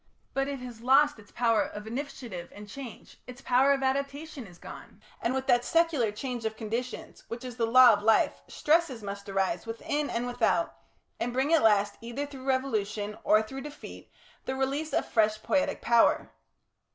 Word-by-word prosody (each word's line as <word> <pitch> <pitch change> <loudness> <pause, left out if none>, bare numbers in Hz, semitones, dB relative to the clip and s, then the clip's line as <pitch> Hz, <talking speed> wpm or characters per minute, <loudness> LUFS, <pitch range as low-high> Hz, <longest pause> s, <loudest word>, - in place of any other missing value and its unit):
But 270 0 0
it 280 -1 -3
has 240 -3 -9
lost 275 +2 +4
its 205 - -17
power 230 -3 +2
of 210 0 -5
initiative 235 -7 -6
and 205 +1 -10
change; 240 +2 -10
its 250 0 -10
power 265 +1 +3
of 275 -1 +1
adaptation 275 0 -2
is 175 -2 -15
gone, - - -11 0.2
and 235 - 0
with 265 0 -2
that 245 -1 +3
secular 325 -10 +2
change 245 +2 -5
of 220 0 -3
conditions 230 +3 -5
which 235 +2 -7
is 250 -2 -7
the 230 -2 +1
law 250 0 +8
of 205 - -1
life, 220 +1 +3
stresses 300 -7 +1
must 200 0 -6
arise 195 0 -1
within 285 +6 -2
and 235 +1 -2
without, 245 -8 0 0.4
and 245 - -1
bring 270 +5 +1
at 325 - +5
last 205 -2 +3
either 240 +5 -4
through 270 -2 -10
revolution 215 -6 -1
or 215 +1 +4
through 265 +5 -7
defeat 295 +1 -10 0.3
the 260 - -2
release 275 +4 -1
of - - +1
fresh 215 -1 +2
poietic 285 -2 0
power. 235 -1 +3
245 Hz, 180 wpm, -28 LUFS, 220-275 Hz, 0.4 s, law